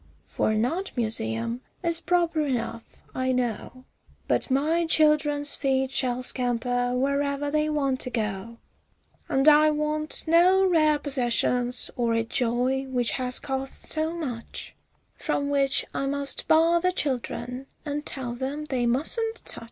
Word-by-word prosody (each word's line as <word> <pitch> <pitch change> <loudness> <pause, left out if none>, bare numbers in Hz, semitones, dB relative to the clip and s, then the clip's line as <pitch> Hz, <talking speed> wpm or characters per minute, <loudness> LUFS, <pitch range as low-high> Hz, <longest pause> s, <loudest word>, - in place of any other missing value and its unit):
for - - -1
an 215 +1 +1
art 365 +9 -3
museum, 115 - -1 0.2
is 335 -1 +2
proper 340 -2 +1
enough, 235 -5 -4
I 260 0 -1
know, 250 +1 -3 0.4
But - - 0
my 315 +6 +1
children's 295 -2 +3
feet 265 -1 0
shall 255 -2 0
scamper 245 0 0
wherever 280 +2 0
they 305 0 +1
want 275 -3 0
to - - +2
go, 220 -1 -4 0.7
And 270 +2 +2
I 305 0 +7
want 305 0 -1
no 360 +4 +5
rare 310 -4 +3
possessions 250 -3 -1
or 235 -2 0
a 230 - +1
joy 245 +3 0
which 245 -2 0
has 250 -1 -1
cost 270 0 -4
so 315 +1 +1
much, 255 -9 -6 0.4
From 285 0 -2
which 275 -1 +1
I 275 - -2
must 280 0 0
bar 330 +2 +4
the 365 +1 +2
children 255 -4 -4 0.2
and 295 0 -3
tell 260 -5 -4
them 270 +5 -4
they 250 -4 -1
"mustn't 445 - +1
touch." - - 0
270 Hz, 145 wpm, -26 LUFS, 245-305 Hz, 0.7 s, I